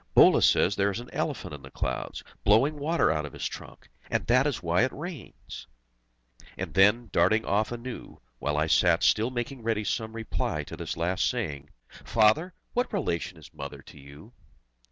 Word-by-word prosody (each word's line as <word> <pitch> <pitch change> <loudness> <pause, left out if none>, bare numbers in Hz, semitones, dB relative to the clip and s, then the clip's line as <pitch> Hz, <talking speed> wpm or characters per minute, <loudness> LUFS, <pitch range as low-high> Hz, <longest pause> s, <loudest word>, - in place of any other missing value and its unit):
Bhola - - +7
says 95 - +4
there 100 +1 +2
is 100 - -3
an 120 - -10
elephant - - -3
in 75 - -8
the 65 - -11
clouds, - - -4 0.2
blowing 135 +9 +3
water 155 - +2
out 75 -1 -1
of 75 - -8
his - - -5
trunk, - - -8 0.2
and - - -1
that 125 +4 +4
is 140 -10 -3
why 85 +2 +2
it 130 - +2
rains!" 155 - -9 0.9
And - - -5
then, 105 +3 +4
darting 110 +4 +3
off 105 +3 +1
anew, 120 +1 -7 0.2
while 75 0 -1
I 75 - +2
sat 85 +1 +3
still 110 +3 +3
making 125 +1 -4
ready 110 -1 -1
some 110 +1 -2
reply 115 -1 -3
to - - -9
this - - -5
last 90 +2 +1
saying, 70 -2 -4 0.3
"Father! 115 +12 +3 0.2
what 245 +1 0
relation 90 - -2
is 80 - -15
Mother - - -8
to - - -14
you?" 70 - -14
110 Hz, 180 wpm, -27 LUFS, 85-125 Hz, 0.9 s, Bhola